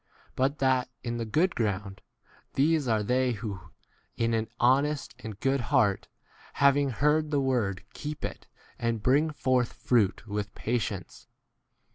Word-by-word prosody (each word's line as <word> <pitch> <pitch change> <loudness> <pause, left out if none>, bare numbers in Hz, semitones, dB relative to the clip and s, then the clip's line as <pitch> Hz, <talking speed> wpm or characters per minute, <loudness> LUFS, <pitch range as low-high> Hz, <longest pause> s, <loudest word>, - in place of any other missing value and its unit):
But 135 +3 +1
that 130 -3 +2
in* 120 -1 -3
the 115 - -2
good 170 - +2
ground, 100 -3 -2 0.5
these 150 0 +2
are 110 -2 +2
they 125 +3 +1
who, 105 -3 -5 0.6
in 115 0 +1
an 110 0 0
honest 140 +4 +2
and 110 -4 -8
good 135 0 +1
heart, 120 -7 +2 0.5
having 140 0 +4
heard 150 +5 +2
the 145 -2 +1
word 120 -9 0
keep 150 0 -5
it, - - -7 0.3
and 115 -2 -1
bring 140 +4 +4
18 155 - -4
forth 130 -3 +1
fruit 115 -3 +1
with 105 -1 -4
patience. 110 -5 -3
125 Hz, 145 wpm, -28 LUFS, 110-140 Hz, 0.6 s, having